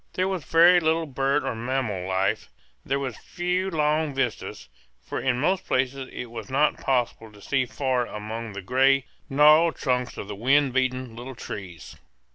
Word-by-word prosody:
There 185 +1 0
was 190 -5 -3
very 170 +5 +6
little 160 0 +1
bird 135 0 0
or - - -2
mammal 115 -5 -2
life; 95 +1 0 0.3
there 135 - -1
were 135 -2 -3
few 180 - -2
long 155 -3 0
vistas, 125 - -3 0.3
for - - -5
in 125 -2 0
most 185 +7 +1
places 130 +1 -1
it 120 -2 -7
was 115 +1 -7
not 145 +3 +1
possible 120 -4 -1
to 105 - -16
see 130 +4 0
far 130 -3 -1
among 110 +1 -6
the 100 -1 -7
gray, 135 +4 +3 0.2
gnarled 150 +4 +5
trunks 125 -2 -1
of - - -6
the 105 - -5
wind 135 +5 +2
beaten 130 -2 -1
little 125 +2 -8
trees. 90 -8 -8
130 Hz, 170 wpm, -25 LUFS, 115-150 Hz, 0.3 s, very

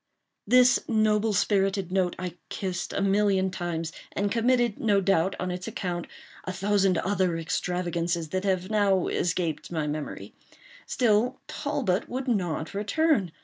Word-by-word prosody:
This 250 +2 +6
noble 215 -1 +2
spirited 195 -2 +1
note 185 -2 +1
I 180 -2 -4 0.2
kissed 185 -2 -3
a 195 - -1
million 195 -1 +2
times, 170 -3 -3 0.2
and 200 0 -1
committed, 240 -1 +2
no 205 -3 +3
doubt, 195 -1 +2
on 180 0 -2
its 180 +1 -5
account, 175 -2 -3 0.4
a 185 - -4
thousand 195 -1 +2
other 185 -4 0
extravagances 170 0 -2
that 185 +3 -2
have 190 0 -1
now 200 -4 +3
escaped 170 -2 -1
my 160 -3 -1
memory. 150 0 -5 0.5
Still 235 0 +2
Talbot 270 -11 -1
would 260 +2 -4
not 175 -9 -1
return. 210 - +1
190 Hz, 140 wpm, -27 LUFS, 175-210 Hz, 0.5 s, This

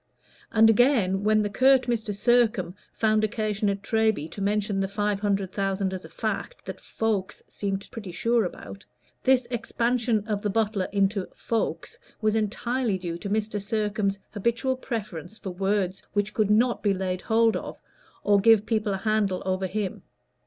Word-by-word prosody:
And 225 0 +6
again, 220 -5 +3
when 215 0 +3
the 205 - -1
curt 260 +3 +5
Mr. 235 -3 -1
Sircome 215 -4 +2 0.2
found 215 -1 +2
occasion 215 -1 0
at 200 0 -3
Treby 220 -9 +1
to 200 - -7
mention 205 0 0
the 195 - 0
five 205 0 -1
hundred 200 -2 0
thousand 195 -1 -1
as 185 - -5
a - - -11
fact - - -4
that - - -7
folks 210 -3 -2
seemed 195 -1 -4
pretty 205 -5 -7
sure 230 +6 +1
about, 195 +2 -7 0.4
this 260 -2 +4
expansion 235 -2 0
of 210 -2 -1
the 210 - -1
butler 205 -2 0
into 200 -1 +1
"folks" 210 -8 -3 0.2
was 215 -1 +1
entirely 225 +1 0
due 170 -2 -5
to 200 - -5
Mr. 210 0 -1
Sircome's 210 -1 -1
habitual 235 +5 0
preference 215 - -5
for 190 - -6
words 195 0 -1
which 205 0 0
could 215 -2 +1
not 235 +3 +3
be 200 -2 +2
laid 185 -1 -2
hold 225 0 +3
of - - -5 0.5
or 205 -1 +4
give 220 0 +5
people 215 -3 0
a - - -2
handle 210 -2 0
over 190 0 0
him. 200 0 -3
210 Hz, 165 wpm, -26 LUFS, 195-225 Hz, 0.5 s, And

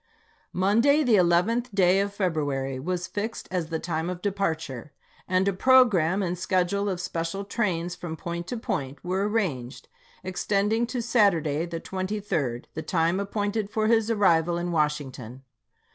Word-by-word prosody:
i86i. - - -36
Monday, 230 +11 +3
the 245 -4 +2
11th 205 +6 +2
day 185 0 +4
of 200 0 0
February, 145 -9 -1
was 180 +5 -2
fixed 210 +4 -4
as 175 -4 -2
the 165 - -1
time 160 0 -3
of 180 -1 -4
departure, 160 - -2 0.3
and 185 +1 +2
a 200 - +2
programme 200 -6 +4
and 175 -1 -2
schedule 185 +2 0
of 185 -2 -2
special 175 +2 -3
trains 180 -5 -1
from 160 -3 -6
point 170 0 -5
to 245 - -3
point 140 -10 -3
were 190 +3 0
arranged, 150 - -2 0.3
extending 210 +5 0
to 245 -1 -3
Saturday, 175 - +2
the 165 -1 -5
23d, 185 - -3
the 160 - -4
time 170 +2 +1
appointed 205 +1 -2
for 215 0 0
his 225 0 +3
arrival 175 -6 +3
in 175 0 -2
Washington. 135 -6 -2
185 Hz, 155 wpm, -26 LUFS, 165-205 Hz, 0.3 s, day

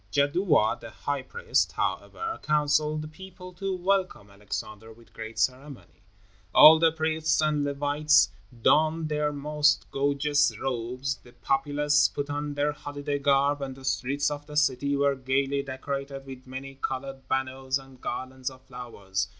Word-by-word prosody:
Jadua, 145 - +2
the - - -9
high - - -3
priest, 475 +1 0
however, 335 0 -3
counseled 150 0 +1
the - - -6
people 180 +3 -11
to 190 +1 -3
welcome 185 - -1
Alexander 110 +2 -7
with 115 +1 -19
great 110 0 -8
ceremony. 135 -1 -3 0.5
All 160 +1 +10
the 165 0 +5
priests 160 0 0
and 155 -1 +2
the 145 0 -1
Levites 145 -3 +3 0.3
donned 155 +1 +3
their 150 0 0
most 150 +1 +1
gorgeous 145 +1 +1
robes, 130 +1 -3
the 120 - -17
populace 145 +3 +2
put 145 0 -4
on 145 0 -3
their 145 +1 +1
holiday 145 0 -4
garb, 140 +1 +2
and 135 -1 -4
the 135 0 -12
streets 140 +2 0
of 145 0 -6
the 150 0 -6
city 140 -1 +2
were 140 0 +3
gaily 135 +1 0
decorated 135 0 -5
with 130 -1 -10
many 135 +1 -7
colored 135 0 -4
banners 130 0 -1
and 135 -2 -15
garlands 130 +1 -4
of 130 0 -15
flowers. 100 -7 -4
140 Hz, 150 wpm, -27 LUFS, 130-150 Hz, 0.5 s, All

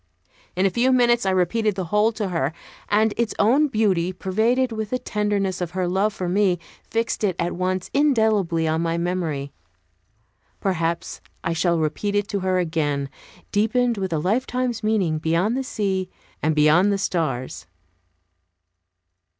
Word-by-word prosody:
In 185 +2 +2
a 195 - +3
few 245 +7 +2
minutes 240 -4 +3
I - - +4
repeated 190 +3 +1
the 190 - -2
whole 210 +2 +4
to 210 -3 -3
her 160 -4 -1 0.4
and 215 +1 +3
its 235 -2 -1
own 265 +9 +4
beauty, 195 -8 +1
pervaded 225 +8 0
with 220 -2 -4
the 255 - 0
tenderness 205 -5 -1
of 175 -2 -3
her 185 -1 +1
love 195 +4 +1
for 185 -3 -4
me, 185 0 +2 0.3
fixed 230 -1 -1
it 190 -4 +1
at 170 +1 -1
once 185 0 -2
indelibly 220 - +2
in 160 +1 0
my 165 0 0
memory. 170 -5 -2 1.1
Perhaps 170 -3 -2 0.2
I 165 - 0
shall 170 +1 +1
repeat 160 +6 -1
it 205 0 +1
to 200 - -1
her 185 0 0
again, 150 -5 -1 0.4
deepened 230 +2 +1
with 190 -2 -2
a 160 - 0
lifetime's 240 - -1
meaning, 195 -8 +1
beyond 170 +8 +1
the 265 - -1
sea, 195 -6 -2 0.3
and 155 0 +1
beyond 155 +7 +4
the 200 - +1
stars. 130 - -2
190 Hz, 160 wpm, -23 LUFS, 170-220 Hz, 1.1 s, I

